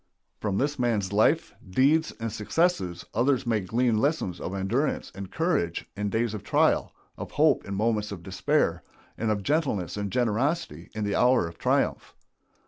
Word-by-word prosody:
From 100 -2 -1
this 145 +3 0
man's 105 -6 0
life, 130 +10 +3 0.2
deeds, 145 - +3
and 115 -1 -3
successes 105 - 0
others 130 +3 +2
may 115 -2 +1
glean 115 +4 +1
lessons 140 - 0
of 95 - -4
endurance 115 +10 -1
and 95 -1 -7
courage 160 - 0
in 105 +1 -2
days 110 +1 0
of 105 - -5
trial, - - +2 0.3
of - - -7
hope - - +3
in 100 - -4
moments 105 0 0
of 90 -4 -7
despair, 95 +1 0 0.3
and 115 - -2
of 105 -2 0
gentleness 130 - 0
and 100 -1 -2
generosity 125 - -1
in 110 - -2
the 100 -1 -1
hour 125 -7 +4
of 85 0 -11
triumph. - - 0
110 Hz, 165 wpm, -27 LUFS, 100-130 Hz, 0.3 s, hour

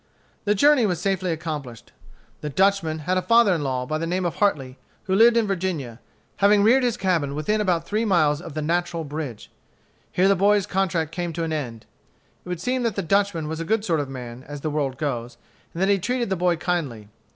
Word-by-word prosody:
The 210 0 +2
journey 285 0 +5
was 180 -4 -1
safely 185 -1 -1
accomplished. 150 -7 -6 0.5
The 150 - -4
Dutchman 185 -1 +1
had 185 +2 +1
a - - -3
father 230 -2 +4
in 160 -4 -1
law, 130 -2 -2
by 155 +4 -2
the 165 - -2
name 180 +2 -1
of 175 - -2
Hartley, 135 -11 0 0.2
who 190 - -2
lived 230 +4 +6
in 230 - +3
Virginia, 170 - -3 0.4
having 200 0 +4
reared 245 +5 +5
his 240 -2 0
cabin 165 - 0
within 210 +9 0
about 175 -5 0
three 215 +4 -1
miles 160 -8 +2
of 165 -4 -9
the 155 - -2
Natural 170 +1 -1
Bridge. 145 -6 -6 0.6
Here 185 +2 +3
the 200 - +4
boy's 200 +1 +3
contract 185 -5 -1
came 175 -1 -3
to 165 - -3
an 160 -1 -2
end. 120 -7 -5 0.6
It - - -11
would 180 -2 -3
seem 250 +7 -1
that 230 -4 -1
the 195 - -2
Dutchman 195 -2 +1
was 160 +1 -4
a - - -2
good 215 +4 0
sort 165 -5 +1
of 145 -2 -3
man, 125 -1 -8
as 145 0 -7
the 155 - -2
world 140 -3 -2
goes, 120 -5 -3 0.3
and 165 - -8
that 195 - +2
he 200 -1 +3
treated 245 +2 -2
the - - +2
boy 180 -1 +1
kindly. 150 - -3
175 Hz, 220 wpm, -23 LUFS, 150-200 Hz, 0.6 s, lived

